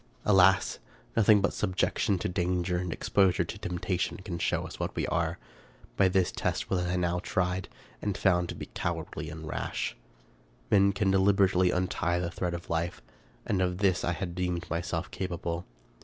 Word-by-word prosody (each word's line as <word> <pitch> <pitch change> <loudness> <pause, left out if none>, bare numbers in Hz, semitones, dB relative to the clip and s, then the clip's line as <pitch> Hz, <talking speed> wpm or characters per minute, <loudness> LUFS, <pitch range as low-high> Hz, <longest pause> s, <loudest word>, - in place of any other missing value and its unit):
Alas! 95 -1 +4 0.4
nothing 110 -2 +6
but 100 - +1
subjection 100 +3 +1
to - - -2
danger 90 0 0
and 90 -1 -2
exposure 95 +1 +2
to - - -7
temptation 90 +1 -2
can 95 -4 -6
show - - 0
us - - -9
what - - -3
we - - 0
are. 85 0 0 0.6
By 95 - +5
this 95 -1 +2
test - - -2
was 95 - +2
I 90 - 0
now 90 0 +1
tried, 90 +1 -1 0.3
and 100 -2 -2
found 90 -3 +2
to - - -4
be - - -6
cowardly - - -3
and 80 0 -8
rash. - - -3 0.8
Men 100 -1 +5
can 100 -1 +1
deliberately 95 -1 +4
untie 90 -1 0
the 85 -1 -2
thread 90 -2 -2
of 85 - -8
life, 85 +1 -2 0.4
and 95 - 0
of 90 -1 0
this 95 -2 +2
I 85 - +1
had 85 0 -4
deemed 90 -1 -2
myself 85 +2 -2
capable. 85 -2 -3
90 Hz, 170 wpm, -29 LUFS, 85-95 Hz, 0.8 s, nothing